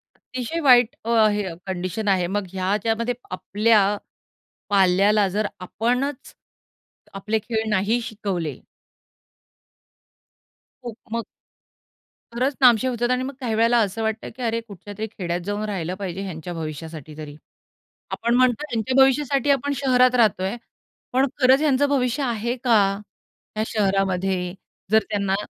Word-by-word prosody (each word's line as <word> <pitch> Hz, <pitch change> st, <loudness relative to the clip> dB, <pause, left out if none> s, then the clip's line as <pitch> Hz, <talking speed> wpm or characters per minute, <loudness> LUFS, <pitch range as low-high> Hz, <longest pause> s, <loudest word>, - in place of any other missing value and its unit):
अतिशय 255 Hz, +6 st, -5 dB
वाईट 250 Hz, -5 st, +5 dB
अ, 230 Hz, -, -3 dB, 0.2 s
हे 210 Hz, 0 st, -1 dB
अ, 170 Hz, -, -5 dB
कंडिशन 185 Hz, +3 st, -3 dB
आहे. 185 Hz, -3 st, +2 dB
मग 205 Hz, +1 st, -2 dB
ह्याच्यामध्ये 220 Hz, +5 st, 0 dB, 0.2 s
आपल्या 205 Hz, +4 st, +2 dB, 0.9 s
पाल्याला 200 Hz, +1 st, +4 dB
जर 205 Hz, +2 st, -1 dB
आपणच 250 Hz, +8 st, -2 dB, 0.8 s
आपले 210 Hz, +3 st, -1 dB
खेळ 220 Hz, -1 st, -1 dB
नाही 210 Hz, +4 st, +1 dB
शिकवले 195 Hz, -, -4 dB, 2.3 s
खूप 235 Hz, -3 st, -7 dB, 0.2 s
मग 230 Hz, -1 st, -1 dB, 1.1 s
खरंच 260 Hz, +4 st, 0 dB
नामशेष 250 Hz, 0 st, +5 dB
होतात 240 Hz, 0 st, -1 dB
आणि 255 Hz, 0 st, +1 dB
मग 275 Hz, -, -5 dB
काही 235 Hz, -5 st, -2 dB
वेळेला 230 Hz, +2 st, +3 dB
असं 215 Hz, +1 st, -1 dB
वाटतं 220 Hz, 0 st, -2 dB
की 255 Hz, -, -10 dB
अरे 230 Hz, 0 st, 0 dB
कुठल्यातरी 205 Hz, +2 st, -7 dB
खेड्यात 175 Hz, -5 st, -4 dB
जाऊन 205 Hz, +1 st, -2 dB
राहिलं 185 Hz, -2 st, -3 dB
पाहिजे 190 Hz, -1 st, -5 dB
ह्यांच्या 175 Hz, -3 st, -6 dB
भविष्यासाठी 155 Hz, -1 st, -7 dB
तरी. 150 Hz, -2 st, -8 dB, 0.8 s
आपण 235 Hz, +1 st, 0 dB
म्हणतो 255 Hz, +1 st, +3 dB
ह्यांच्या 235 Hz, +1 st, -1 dB
भविष्यासाठी 275 Hz, 0 st, +2 dB
आपण 285 Hz, +1 st, +1 dB
शहरात 255 Hz, -1 st, +3 dB
राहतोय. 205 Hz, -3 st, +2 dB, 0.6 s
पण 260 Hz, +2 st, +4 dB, 0.2 s
खरंच 260 Hz, +2 st, +5 dB
ह्यांचं 285 Hz, -2 st, +3 dB
भविष्य 270 Hz, 0 st, 0 dB
आहे 235 Hz, 0 st, -1 dB
का? 235 Hz, -3 st, +5 dB, 0.8 s
ह्या 215 Hz, -, 0 dB
शहरामध्ये? 190 Hz, -3 st, 0 dB, 0.4 s
जर 220 Hz, -1 st, +5 dB
त्यांना 200 Hz, -2 st, 0 dB
220 Hz, 130 wpm, -23 LUFS, 190-245 Hz, 2.3 s, वाईट